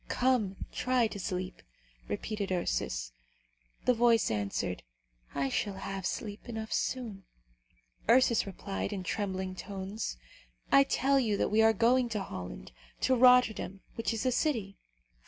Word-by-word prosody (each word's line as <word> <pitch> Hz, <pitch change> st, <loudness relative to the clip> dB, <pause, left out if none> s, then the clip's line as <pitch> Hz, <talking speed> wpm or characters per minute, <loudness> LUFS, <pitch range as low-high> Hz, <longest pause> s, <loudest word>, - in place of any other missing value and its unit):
"Come! 245 Hz, -7 st, +1 dB, 0.2 s
try 255 Hz, -2 st, +2 dB
to 215 Hz, -2 st, -4 dB
sleep," 185 Hz, 0 st, -4 dB, 0.5 s
repeated 200 Hz, -, -3 dB
Ursus. -, -, -1 dB, 0.7 s
The 250 Hz, -, +5 dB
voice 230 Hz, -, +3 dB
answered, 100 Hz, -3 st, -2 dB, 0.5 s
"I 140 Hz, -1 st, +1 dB
shall 200 Hz, +7 st, -1 dB
have 195 Hz, -1 st, -4 dB
sleep 210 Hz, +2 st, -5 dB
enough 220 Hz, -1 st, -4 dB
soon." 220 Hz, -7 st, -2 dB, 0.8 s
Ursus 235 Hz, -4 st, +5 dB
replied, 195 Hz, +1 st, -4 dB
in 195 Hz, -3 st, -4 dB
trembling 190 Hz, -1 st, -2 dB
tones, 195 Hz, +2 st, -5 dB, 0.5 s
"I 275 Hz, 0 st, +7 dB
tell 275 Hz, 0 st, +2 dB
you 215 Hz, -5 st, +1 dB
that -, -, +1 dB
we 220 Hz, +1 st, +4 dB
are 220 Hz, 0 st, +6 dB
going 240 Hz, +3 st, +3 dB
to 210 Hz, -3 st, -2 dB
Holland, 90 Hz, -, -7 dB, 0.3 s
to 260 Hz, -, +3 dB
Rotterdam, 250 Hz, -6 st, +4 dB
which 230 Hz, -, -1 dB
is 225 Hz, +2 st, -2 dB
a 255 Hz, -, +3 dB
city." 230 Hz, -8 st, 0 dB
210 Hz, 135 wpm, -31 LUFS, 190-240 Hz, 0.8 s, I